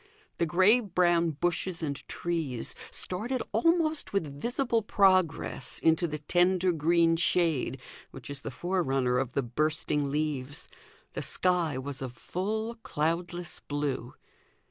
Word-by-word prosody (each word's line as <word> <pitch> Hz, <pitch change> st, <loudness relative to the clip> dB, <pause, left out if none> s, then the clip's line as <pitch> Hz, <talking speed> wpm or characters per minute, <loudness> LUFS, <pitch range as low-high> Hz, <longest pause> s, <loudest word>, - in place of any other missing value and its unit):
The 170 Hz, -, +2 dB
grey 190 Hz, +9 st, +5 dB
brown 175 Hz, -5 st, +2 dB
bushes 175 Hz, 0 st, 0 dB
and 140 Hz, -2 st, -1 dB
trees 160 Hz, -8 st, 0 dB, 0.2 s
started 230 Hz, +8 st, 0 dB
almost 315 Hz, -, +1 dB
with 145 Hz, -7 st, -2 dB
visible 240 Hz, -1 st, 0 dB
progress 185 Hz, -, +2 dB
into 165 Hz, +2 st, +2 dB
the 155 Hz, -1 st, -4 dB
tender 180 Hz, +4 st, +2 dB
green 165 Hz, +1 st, +3 dB
shade 165 Hz, -5 st, +1 dB, 0.3 s
which 130 Hz, -, -11 dB
is 140 Hz, -1 st, -4 dB
the -, -, -5 dB
forerunner 135 Hz, -9 st, 0 dB
of 130 Hz, -2 st, -3 dB
the 140 Hz, -, 0 dB
bursting 150 Hz, +3 st, 0 dB
leaves. 145 Hz, -2 st, -2 dB, 0.5 s
The -, -, -3 dB
sky 175 Hz, -6 st, 0 dB
was 135 Hz, +1 st, -6 dB
of 130 Hz, -2 st, -5 dB
full 220 Hz, -, -3 dB
cloudless 170 Hz, +2 st, -2 dB
blue. 140 Hz, -4 st, -3 dB
170 Hz, 125 wpm, -29 LUFS, 145-185 Hz, 0.5 s, grey